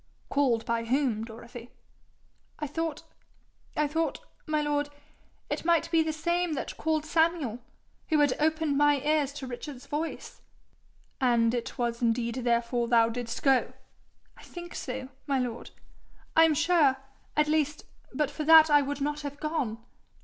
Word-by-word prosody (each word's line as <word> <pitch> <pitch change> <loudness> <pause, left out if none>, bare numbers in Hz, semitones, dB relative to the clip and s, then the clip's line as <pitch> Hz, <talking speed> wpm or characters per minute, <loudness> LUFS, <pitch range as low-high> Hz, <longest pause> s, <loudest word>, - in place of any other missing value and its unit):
'Called 250 -6 +1
by 230 0 -1
whom, 245 -3 +1
Dorothy?' 235 +1 -10 0.9
'I 300 - -3
thought 315 +1 -3 0.7
I 300 - +3
thought, 320 +3 -1 0.3
my 310 0 +1
lord, 295 -1 0 0.6
it - - -3
might 335 0 +2
be 330 -1 +4
the 315 0 0
same 345 +2 0
that 280 - -4
called 315 -1 -1
Samuel, 320 -7 +1 0.5
who 315 - +3
had 290 -3 +4
opened 310 -2 +1
my 290 -1 +4
ears 295 -1 +1
to 295 - -7
hear 260 - -6
Richard's 255 +2 -7
voice.' 300 +4 -5 0.8
'And 235 -2 +3
it 240 +1 -4
was 235 -1 -2
indeed 235 0 +1
therefore 235 -1 0
thou 230 -1 +4
didst 235 0 -5
go?' 270 -3 +3 0.6
'I - - -14
think 345 0 -9
so, 260 0 -5 0.2
my 275 -1 +1
lord. 245 -2 -3 0.7
I 325 - +8
am 315 -2 +2
sure, 315 -4 +3 0.4
at 300 0 +4
least, 300 -1 0 0.3
but 290 +1 -1
for 310 - -4
that 320 0 +8
I 290 0 +6
would 285 0 -4
not 295 +1 -1
have 285 0 -6
gone. 305 -8 -2
290 Hz, 155 wpm, -28 LUFS, 245-310 Hz, 0.9 s, I